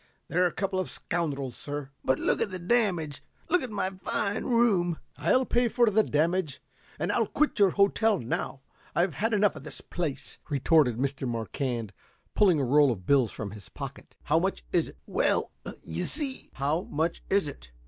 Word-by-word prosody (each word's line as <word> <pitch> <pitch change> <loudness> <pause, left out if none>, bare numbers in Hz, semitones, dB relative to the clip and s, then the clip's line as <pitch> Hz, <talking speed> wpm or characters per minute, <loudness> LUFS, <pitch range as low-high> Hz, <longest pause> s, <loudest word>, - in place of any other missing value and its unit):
They 170 - -3
are 180 - +5
a - - -3
couple 190 0 -1
of 185 - -2
scoundrels, 140 -7 -3
sir." 145 -2 -6
"But 130 - +2
the 190 -4 0
damage. 180 - 0 0.3
Look 360 +1 +3
at 255 - -4
my 200 -3 -1
fine 200 +2 -2
room." 205 -9 +3 0.2
"I'll 170 - +2
pay 240 0 +2
for 235 -1 +3
the 220 +2 +5
damage, 165 -2 0 0.4
and - - -1
I'll - - +2
quit 305 -6 0
your 200 -2 +6
hotel 200 +3 +3
now. 130 +1 -3 0.3
I've 170 +1 +2
had 220 +10 0
enough 205 -2 +3
of - - -9
the - - -8
place," 155 -7 -4
retorted 140 -3 +3
Mr. 135 0 -1
Marquand, 115 -1 -3 0.4
pulling 185 -7 +4
a 135 - +1
roll 145 +1 +5
of 95 -6 -5
bills 130 -1 +4
from 105 -1 -6
his 105 -4 -10
pocket. - - -8
"How - - +3
much - - -1
is - - +2
it?" - - -15
"Well, - - +1 0.3
you 85 +2 -3
see 280 -3 -4
" - - -36
"How 145 +5 0
much 160 +3 -1
is 195 -4 +2
it?" - - -9
170 Hz, 185 wpm, -28 LUFS, 135-200 Hz, 0.4 s, your